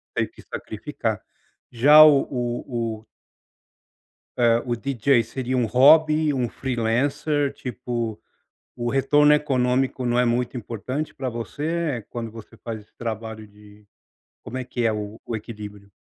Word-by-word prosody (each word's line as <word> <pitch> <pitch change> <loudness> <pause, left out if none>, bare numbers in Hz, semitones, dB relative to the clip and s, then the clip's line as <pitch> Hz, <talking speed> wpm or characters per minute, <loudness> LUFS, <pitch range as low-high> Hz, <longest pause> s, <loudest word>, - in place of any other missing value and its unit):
teve - - 0
que - - -16
sacrificar, - - -4 0.5
já 145 +6 +7
o 145 -3 +6
o 120 -2 -3
o - - -28 1.3
eh, 120 -1 +3
o 120 -1 -1
DJ 130 0 +2
seria 130 +2 -3
um 125 -2 +2
hobby, 155 +6 +5
um 125 -3 -1
freelancer, 135 +5 0
tipo, 120 -3 -4 0.6
o 120 -1 -2
retorno 145 +3 +4
econômico 130 -3 0
não 120 0 +1
é 125 - +4
muito 120 +1 0
importante 125 +6 -4
pra 130 -1 -4
você 145 +2 -3
quando 115 -2 -5
você 115 +1 -12
faz 110 +1 -6
esse 105 - -23
trabalho 110 -1 -5
de 105 0 -18 0.6
como 130 - -6
é 130 - -3
que 125 -1 -3
é 115 - +3
o 105 +1 -6 0.2
equilíbrio? 105 -2 -9
120 Hz, 140 wpm, -23 LUFS, 115-135 Hz, 1.3 s, já